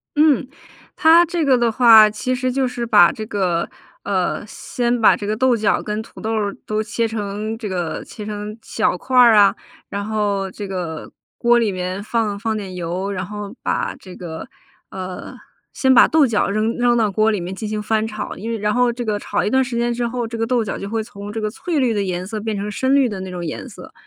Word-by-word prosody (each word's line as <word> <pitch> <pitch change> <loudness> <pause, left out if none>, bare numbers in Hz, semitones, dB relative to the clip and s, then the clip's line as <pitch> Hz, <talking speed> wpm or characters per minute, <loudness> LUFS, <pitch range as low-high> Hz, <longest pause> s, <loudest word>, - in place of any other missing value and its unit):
嗯， 295 -4 +3 0.5
它 330 +2 +6
这 340 -2 -1
个 265 -2 +4
的 235 -1 +2
话， 220 -3 +7
其 235 +5 -2
实 255 0 -1
就 265 0 0
是 245 -1 -4
把 210 -6 +6
这 220 -5 -6
个 185 -5 -1 0.3
呃， - - -1
先 240 -1 -2
把 220 - +6
这 205 - -6
个 210 +1 -1
豆 255 -1 +3
角 215 -1 +1
跟 210 +1 -3
土 - - -13
豆 220 +1 -2
儿 205 -2 -1
都 215 0 -1
切 220 +2 -1
成 215 0 -4
这 220 -3 -5
个 175 -3 -3
切 210 - -9
成 210 0 -6
小 215 -4 -1
块 255 +7 -2
儿 235 -3 +8
啊， 205 -1 +6 0.3
然 200 0 -4
后 205 -3 -1
这 205 0 -7
个 175 -5 -5 0.3
锅 240 0 +4
里 225 -4 +1
面 185 +2 -4
放 215 -2 -1
放 220 +1 -2
点 195 -3 -6
油， 180 +3 -3
然 190 -2 -3
后 205 +1 -7
把 - - -1
这 185 - -12
个， 165 -3 -8 0.4
呃， 185 -1 -7 0.4
先 265 -1 +3
把 - - +7
豆 310 -4 +4
角 220 -3 +1
扔 215 +3 0
扔 240 0 +3
到 220 -3 +2
锅 215 +3 +2
里 205 - -1
面 180 +2 -5
进 215 +1 -5
行 215 0 -2
翻 220 +1 0
炒， 215 -1 -5
因 225 +4 -6
为 230 - -2
然 210 0 0
后 245 -1 +3
这 240 0 -5
个 210 -1 0
炒 - - -2
一 - - +1
段 265 +2 +3
时 245 -2 -4
间 240 0 0
之 240 0 -2
后， 240 -1 -3
这 230 0 -6
个 225 - 0
豆 245 0 +1
角 210 - -3
就 200 - -6
会 225 0 -1
从 205 -1 -8
这 225 - -4
个 215 -1 -1
翠 310 +7 -3
绿 250 -4 +2
的 205 - 0
颜 185 -1 -3
色 220 0 -5
变 215 -1 -3
成 200 +1 -3
深 260 +6 0
绿 275 -2 +4
的 200 -4 -5
那 190 -1 -6
种 175 -1 -5
颜 155 - -5
色。 - - -12
215 Hz, 255 characters per minute, -20 LUFS, 200-240 Hz, 0.5 s, 儿